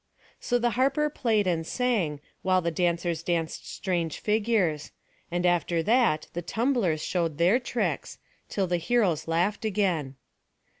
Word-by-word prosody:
So 245 - +1
the 240 0 +1
harper 275 +5 +1
played 220 -7 +1
and 170 -3 0
sang, 185 - -1 0.2
while 185 0 +3
the 170 -1 -1
dancers 170 -1 0
danced 165 -2 -2
strange 170 -5 -2
figures; 210 -8 +1 0.4
and 175 +1 -1
after 170 -1 +2
that 220 -8 +3
the 175 - -3
tumblers 220 - 0
showed 165 -5 -1
their 180 +9 +4
tricks, 245 -1 -2 0.3
till 195 - 0
the 180 -1 0
heroes 175 -4 +1
laughed 175 +7 0
again. 185 -10 0
180 Hz, 140 wpm, -27 LUFS, 165-225 Hz, 0.4 s, their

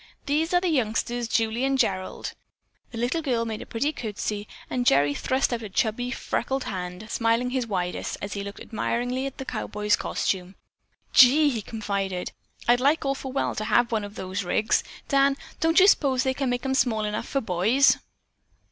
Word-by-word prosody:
These 310 +3 +1
are 355 - +4
the 365 - -1
youngsters, 240 -3 0
Julie 225 +2 0
and 270 0 +2
Gerald." 185 -6 -1 0.6
The 235 - -8
little 245 +8 0
girl 245 -6 0
made 220 -2 -4
a - - -9
pretty 280 +7 -1
curtsy 210 -3 -4 0.2
and 250 - -1
Gerry 145 - +4
thrust 260 - 0
out 235 - -2
a 215 - -6
chubby, 225 +5 0
freckled 265 +1 -2
hand, 180 +2 -5
smiling 230 +2 +1
his 255 -2 -1
widest 180 -4 -2
as 200 -1 -5
he 200 - -4
looked 200 0 -8
admiringly 245 +4 -2
at 270 - -8
the 265 - -6
cowboy's 210 -3 0
costume. 185 0 -2 0.6
"Gee!" 285 +4 +7
he 230 -4 -2
confided, 200 -4 -3 0.4
"I'd 240 +1 +5
like 285 +4 +2
awful 275 -1 -2
well 275 - 0
to 215 - -3
have 240 +2 +3
one 220 -2 0
of 205 +1 -8
those 185 +1 -4
rigs. 215 +5 +1 0.2
Dan, 275 0 +3 0.2
don't 325 +2 +4
you 375 - +8
s'pose 270 -9 +4
they 265 -1 +1
make 245 +1 -1
'em 265 - 0
small 225 -5 +1
enough 210 0 -3
for 275 - 0
boys?" 220 +6 +3
235 Hz, 185 wpm, -25 LUFS, 210-265 Hz, 0.6 s, you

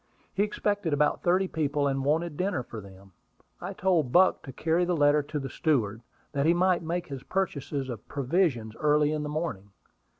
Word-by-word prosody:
He 195 - 0
expected 205 -4 0
about 150 +1 +2
thirty 185 +2 +2
people, 145 -3 0
and 135 -1 -1
wanted 155 +3 0
dinner 185 -6 -1
for 115 -2 -8
them. 95 0 -15 0.5
I 190 +3 -5
told 175 -9 +1
Buck 185 +5 +5
to 135 - -9
carry 165 +6 +1
the 175 -1 0
letter 145 0 +4
to 145 +1 -5
the 135 -2 -3
steward, 120 -7 0 0.3
that 140 +1 0
he 170 - +5
might 180 0 +3
make 170 +1 -3
his 135 -2 -6
purchases 145 -7 -2
of 120 -5 -7
provisions 135 - 0
early 150 0 +3
in 155 -1 -1
the 150 - -4
morning. 150 - -3
150 Hz, 190 wpm, -28 LUFS, 135-175 Hz, 0.5 s, Buck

